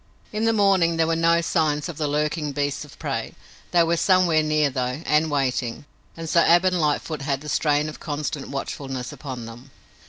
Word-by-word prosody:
In 215 Hz, +1 st, 0 dB
the 225 Hz, -, +4 dB
morning 195 Hz, -6 st, +3 dB
there 165 Hz, -, +3 dB
were 165 Hz, 0 st, +1 dB
no 165 Hz, +1 st, +3 dB
signs 155 Hz, -3 st, 0 dB
of 170 Hz, -4 st, -7 dB
the 150 Hz, -, 0 dB
lurking 150 Hz, 0 st, -1 dB
beasts 145 Hz, 0 st, -2 dB
of -, -, -14 dB
prey. -, -, -4 dB, 0.3 s
They 170 Hz, -1 st, +4 dB
were 170 Hz, +1 st, +1 dB
somewhere 180 Hz, -4 st, +4 dB
near, 155 Hz, -2 st, +1 dB
though, 130 Hz, +3 st, -3 dB
and 150 Hz, +1 st, +2 dB
waiting, 130 Hz, -3 st, -1 dB, 0.3 s
and 165 Hz, 0 st, -6 dB
so 170 Hz, -, +3 dB
Ab 175 Hz, +2 st, +5 dB
and 185 Hz, -2 st, +2 dB
Lightfoot 150 Hz, 0 st, -1 dB
had 135 Hz, -1 st, -2 dB
the 150 Hz, -, -7 dB
strain 150 Hz, 0 st, +1 dB
of 155 Hz, -, -8 dB
constant 145 Hz, -2 st, -4 dB
watchfulness 135 Hz, -2 st, -5 dB
upon 130 Hz, -5 st, -7 dB
them. 120 Hz, +4 st, -11 dB
150 Hz, 195 wpm, -23 LUFS, 140-165 Hz, 0.3 s, Ab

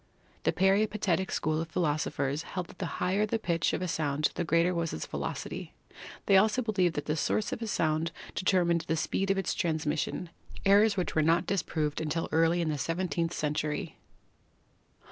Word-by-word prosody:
The -, -, +4 dB
peripatetic 195 Hz, -1 st, +2 dB
school 155 Hz, 0 st, 0 dB
of 165 Hz, -, -4 dB
philosophers 150 Hz, -3 st, -1 dB
held 180 Hz, 0 st, -5 dB
that -, -, -15 dB
the 180 Hz, -, -2 dB
higher 200 Hz, +4 st, +1 dB
the 225 Hz, -, 0 dB
pitch 170 Hz, -7 st, 0 dB
of -, -, -2 dB
a -, -, -1 dB
sound 150 Hz, -2 st, 0 dB
the 175 Hz, -, -2 dB
greater 170 Hz, +2 st, +2 dB
was 170 Hz, -2 st, -1 dB
its 80 Hz, -, -4 dB
velocity; -, -, -5 dB, 0.5 s
they 195 Hz, -, +6 dB
also 220 Hz, +6 st, +3 dB
believed 190 Hz, -6 st, +1 dB
that 145 Hz, -, -3 dB
the 150 Hz, -, 0 dB
source 205 Hz, +7 st, 0 dB
of -, -, -5 dB
a 225 Hz, -, -3 dB
sound 160 Hz, -4 st, 0 dB, 0.2 s
determined 175 Hz, -3 st, +2 dB
the 160 Hz, -, 0 dB
speed 195 Hz, +4 st, -1 dB
of 195 Hz, -, +2 dB
its 190 Hz, -2 st, 0 dB
transmission, 160 Hz, +1 st, -1 dB, 0.3 s
errors 200 Hz, +1 st, +5 dB
which 180 Hz, -, -1 dB
were 155 Hz, -, +3 dB
not 165 Hz, +3 st, +3 dB
disproved 155 Hz, -6 st, -1 dB
until 160 Hz, +1 st, -1 dB
early 165 Hz, +2 st, +3 dB
in 165 Hz, -, 0 dB
the 150 Hz, -2 st, -2 dB
seventeenth 170 Hz, +1 st, -1 dB
century. 150 Hz, 0 st, -2 dB
170 Hz, 180 wpm, -29 LUFS, 155-190 Hz, 0.5 s, they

